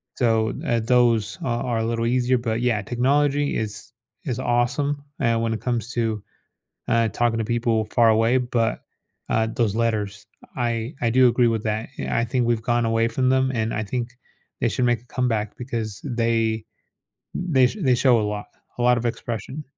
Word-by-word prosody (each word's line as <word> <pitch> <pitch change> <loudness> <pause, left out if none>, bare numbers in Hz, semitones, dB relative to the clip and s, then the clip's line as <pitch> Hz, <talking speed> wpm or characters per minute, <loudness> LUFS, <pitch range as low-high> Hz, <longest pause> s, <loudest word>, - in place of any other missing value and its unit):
So, 115 -3 +1
eh, 120 -1 +1
those 115 -3 +2
are 120 -1 -1
are 120 -2 -1
a 115 - -1
little 115 0 -1
easier, 125 +1 +2
but, 115 -1 -2
yeah, 115 -4 +1
technology 140 +6 +1
is 110 +1 -5 0.3
is 125 -5 -2
awesome 130 +4 0 0.2
and 115 -3 +1
when 115 0 0
it 110 - -4
comes 120 -1 -2
to, 110 -3 -1 0.7
eh, 115 -1 +3
talking 120 +1 0
to 115 - -1
people 115 -1 0
far 115 +1 +3
away, 115 +3 +3
but, 120 -2 -1 0.5
uh, 110 0 +2
those 115 -2 0
letters, 105 -4 -1 0.3
I 120 +1 -2
I 115 -1 +1
do 130 +2 +5
agree 120 0 +3
with 110 -2 -1
that 110 +1 -2
yeah - - -2
I 115 - +2
think 120 0 0
we've 115 -1 +1
gone 120 0 +1
away 115 0 +2
from 130 +2 0
them 130 0 +2
and 110 -1 -1
I 110 - -1
think 120 +3 -3 0.5
they 120 - +2
should 125 +3 0
make 120 -2 +2
a 125 - -25
comeback 115 -5 -1
because 115 -5 -4
they 115 -3 0 0.9
th 130 +5 +4
they 215 - -9
they 125 - +6
show 120 -3 +4
a - - 0
lot, 105 0 -4 0.3
a 120 - -1
lot 125 0 +4
of 120 - -2
expression. 120 +5 -4
115 Hz, 190 wpm, -23 LUFS, 115-125 Hz, 0.9 s, they